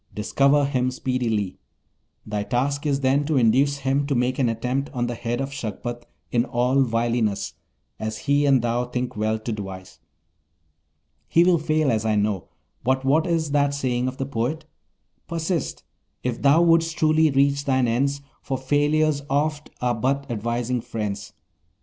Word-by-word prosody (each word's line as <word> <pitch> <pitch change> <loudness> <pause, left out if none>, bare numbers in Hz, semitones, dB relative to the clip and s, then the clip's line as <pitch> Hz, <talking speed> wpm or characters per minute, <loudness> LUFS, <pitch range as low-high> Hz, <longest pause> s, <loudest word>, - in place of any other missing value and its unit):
Discover 140 +7 +3
him 130 -2 0
speedily. 120 -6 -2 0.7
Thy 105 -1 -2
task 140 +7 -1
is 140 -1 0
then 135 +2 +2
to 155 -3 +1
induce 130 +4 +3
him 140 +1 0
to 140 - 0
make 125 +2 0
an 125 -3 +3
attempt 125 +5 -2
on 120 -2 -1
the 120 - -3
head 120 +1 -3
of 135 +1 -3
Shagpat 120 -1 -5 0.2
in 120 -1 +3
all 125 +2 +1
wiliness, 115 -3 0 0.5
as 110 0 -3
he 145 +4 +1
and 135 -4 +4
thou 120 +1 0
think 125 0 -3
well 110 +1 0
to 110 +2 -5
devise. 95 -5 -7 1.3
He 170 - +4
will 175 -2 +4
fail, 155 -2 +1
as 110 -1 0
I 110 -1 +1
know, 105 -3 0 0.4
but 130 +2 +1
what 155 +5 +3
is 165 -3 0
that 140 -1 +2
saying 125 -2 -1
of 130 0 -4
the 135 - -2
poet? 140 +5 -2 0.6
"Persist, 165 -1 -2 0.4
if 125 -2 -2
thou 145 +4 +5
wouldst 165 0 +3
truly 155 0 +4
reach 140 0 +2
thine 130 -2 +2
ends, 140 +4 0 0.2
For 135 - -3
failures 145 +2 +1
oft 150 +2 0
are 125 -1 +1
but 135 +4 0
advising 120 +2 -1
friends." 110 -4 -4
130 Hz, 160 wpm, -24 LUFS, 120-145 Hz, 1.3 s, thou